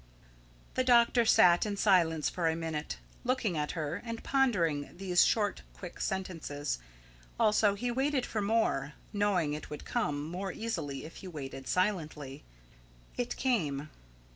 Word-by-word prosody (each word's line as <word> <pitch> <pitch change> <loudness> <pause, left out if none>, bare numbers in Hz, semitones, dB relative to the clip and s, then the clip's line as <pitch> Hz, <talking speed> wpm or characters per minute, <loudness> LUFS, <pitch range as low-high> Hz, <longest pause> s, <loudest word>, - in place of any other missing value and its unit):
The 255 - +1
doctor 240 -1 +5
sat 175 -5 +6
in 205 -2 -2
silence 170 -7 +3
for 170 -2 -1
a 160 - 0
minute, 160 -2 -4 0.3
looking 245 -7 0
at 150 -1 -1
her 160 +2 -3
and 230 -1 -6
pondering 180 - +1
these 180 -2 +4
short, 205 -3 +1
quick 180 -3 -9
sentences. 165 - -3 0.6
Also 215 -2 +4
he 245 +4 -2
waited 265 +1 +1
for 215 - -2
more, 200 -10 +1 0.2
knowing 195 -7 +1
it 150 - -6
would 150 - -7
come 145 0 -1
more 185 +3 -4
easily 150 -13 -4
if 160 - -10
he 190 - -9
waited 135 -5 -7
silently. 155 -7 -1 0.7
It 245 0 -2
came. 155 - 0
180 Hz, 140 wpm, -31 LUFS, 150-220 Hz, 0.7 s, sat